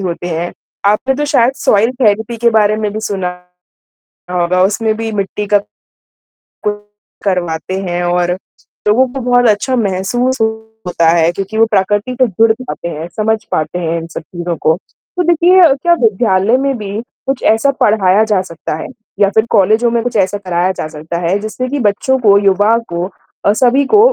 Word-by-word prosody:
होते 175 -2 -4
हैं। 170 +1 -3 0.3
आपने 210 +6 +2
तो 295 +2 -2
शायद 245 -3 +3
सॉइल 220 +4 +2
थेरेपी 220 0 +1
के 235 +1 +2
बारे 215 -1 +3
में 215 -1 -2
भी 215 - -4
सुना 195 -4 -2 1.0
होगा, 180 0 +1
उसमें 215 +3 0
भी 225 0 -3
मिट्टी 205 0 -3
का 205 - +6 1.6
करवाते 180 -1 -2
हैं 175 -2 -2
और 175 0 +1 0.6
लोगों 245 +5 +4
को 270 - -4
बहुत 245 0 +3
अच्छा 215 +5 +1
महसूस 235 +4 0 0.5
होता 170 -2 +2
है 165 0 +3
क्योंकि 195 +4 -5
वो 225 - +5
प्रकृति 205 +3 +1
से 255 - +5
जुड़ 225 +2 +3
पाते 255 -8 -6
हैं, 160 0 -6
समझ 220 0 0
पाते 160 +3 -1
हैं 165 -1 -1
इन 165 - -8
सब 165 - -7
चीज़ों 175 +1 -5
को। 160 - +3 0.4
तो 360 - +2
देखिए 345 +2 +4 0.2
क्या 345 - +4
विद्यालय 220 0 +2
में 275 0 0
भी 205 -3 -6 0.4
कुछ 270 -1 -1
ऐसा 225 +6 +3
पढ़ाया 205 -1 +3
जा 210 -4 +1
सकता 165 -4 -6
है 160 - -6 0.3
या 200 -1 +4
फिर 220 0 +4
कॉलेजों 220 +5 +3
में 235 -1 0
कुछ 245 0 -3
ऐसा 200 +1 +1
कराया 180 -2 -1
जा 185 - -5
सकता 155 +2 -6
है? 175 +3 0
जिससे 215 +4 -4
कि 285 +2 -2
बच्चों 230 +4 +1
को, 205 -4 +5
युवा 205 +3 +3
को 175 +2 -3 0.4
अ, 200 - +5
सभी 255 +4 +3
को 420 +10 +4
205 Hz, 180 wpm, -14 LUFS, 180-235 Hz, 1.6 s, का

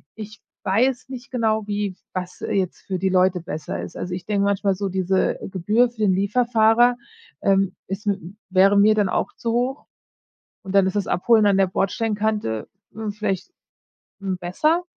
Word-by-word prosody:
ich 215 -1 -9 0.2
weiß 250 +6 +1
nicht 255 -1 -9
genau, 220 -3 0
wie 205 -2 -2 0.2
was 180 -1 -5
jetzt 190 -3 -2
für 190 - -2
die 190 0 +1
Leute 185 0 +3
besser 155 -2 -5
ist. - - -9
Also, 180 - -4
ich 180 0 -5
denke 200 -2 +1
manchmal 200 -1 +1
so, 195 +1 -3
diese 190 0 +1
Gebühr 210 +7 +2
für 235 -2 -22
den 200 -3 +4
Lieferfahrer, 230 +3 +3 0.4
ähm, 195 -1 +2
ist 195 +3 -5
mit 200 -1 +1
'm 185 +5 -11
wäre 195 +2 +5
mir 215 +2 +6
dann 205 -3 +2
auch - - -1
zu 230 - -3
hoch 250 +4 -1 0.8
und 190 - -6
dann 195 -1 +5
ist 190 - -3
das 205 -2 0
Abholen 220 +3 +3
an 200 -1 +4
der 195 -1 +4
Bordstein-Kante, 205 - -1 0.3
hm, 220 -1 -4
vielleicht, 205 - -3 0.7
hm, 190 -2 -2
besser? 305 - +1
200 Hz, 175 wpm, -22 LUFS, 190-220 Hz, 0.8 s, mir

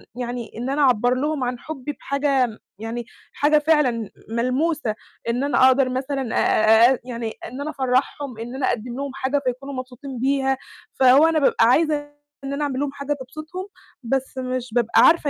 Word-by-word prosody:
يعني، 245 -1 -5
إن 245 +3 -3
أنا 290 +2 0
أعبّر 245 -2 +4
لهُم 290 0 -1
عن 245 0 -2
حُبّي 295 -1 -6
بحاجة 280 -2 +1
م 220 - -10 0.2
يعني 230 +1 -5 0.3
حاجة 300 +1 +3
فعلًا 280 -8 +2 0.2
ملموسة، 255 +1 0 0.3
إن 245 +3 0
أنا 265 -2 +4
أقدر 260 0 +4
مثلًا 260 -1 -2
آآ، 220 +3 +5
آآ - - -4
يعني 235 -3 -5
إن 260 +3 -7
أنا 305 - -3
أفرّحهم، 265 -2 -1
إن 240 +3 -6
أنا 265 -1 0
أقدّم 240 +2 -3
لهُم 280 0 -4
حاجة 275 +1 -1
فيكونوا 265 +3 -3
مبسوطين 255 0 -7
بيها، 270 0 +1 0.4
فهو 265 +4 +7
أنا 320 -1 +2
بابقى 270 -4 +4
عايزة 305 +5 +4 0.5
إن 275 - -4
أنا 295 +1 -2
أعمل 270 -2 -2
لهُم 285 -1 -1
حاجة 285 +1 -3
تبسطهُم، 310 +8 -8 0.4
بس 265 +2 -2
مش 255 -2 -3
بابقى 235 -2 +3
عارفة 325 -3 +5
260 Hz, 175 wpm, -22 LUFS, 245-285 Hz, 0.5 s, فهو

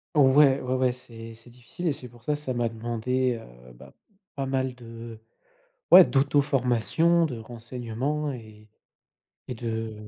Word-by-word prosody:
Ouais, 140 -1 +5
ouais, 125 0 -3
ouais. 130 -1 +2
C'est 115 -2 -11
c'est 115 +1 -17
difficile 125 +8 -9
et - - +3
c'est 125 -3 -9
pour 120 0 -19
ça, 150 +2 0
ça 145 -3 -4
m'a 120 -1 0
demandé, 120 +2 -2 0.3
heu, 65 - -14
bah - - -15 0.4
pas 135 -1 -3
mal 130 -1 -1
de 115 -2 -10 0.7
ouais, 180 +1 +11
d'auto-formation, 140 - +2
de 125 -7 -3
renseignements 120 +5 -4
et 110 -3 -12 0.8
et 125 - -4
de 115 -1 -4
125 Hz, 150 wpm, -26 LUFS, 115-135 Hz, 0.8 s, ouais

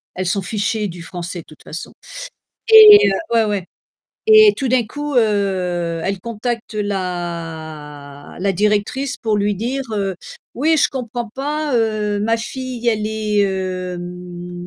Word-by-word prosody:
elle 185 - -3
s'en 195 +3 0
fichait 210 +2 -2
du 170 0 -9
français 175 +1 -6
de 165 - -11
toute 155 - -17
façon. 165 - -8 0.8
Et 420 - +10 0.2
ouais, 225 -1 +4
ouais 205 -4 -2 0.6
et 435 -1 +8
tout 270 - -2
d'un 245 -1 +2
coup, 290 +4 -5
heu, 185 -6 0
elle 195 -1 -2
contacte 230 +1 -4
la 165 -7 -5
la 195 +1 +1
directrice 210 +8 0
pour 220 -3 -1
lui 205 0 +1
dire, 250 +7 -3
heu: 195 -2 -1 0.4
«Oui 315 +5 +2
je 295 - +3
comprends 240 -3 -5
pas, 295 +3 -2
heu, 215 -2 0
ma 225 +2 +1
fille 250 +1 -6
elle 215 -2 0
est, 215 -1 0
heu 185 -1 -3
mmh, 175 0 -8
205 Hz, 145 wpm, -19 LUFS, 180-235 Hz, 0.8 s, Et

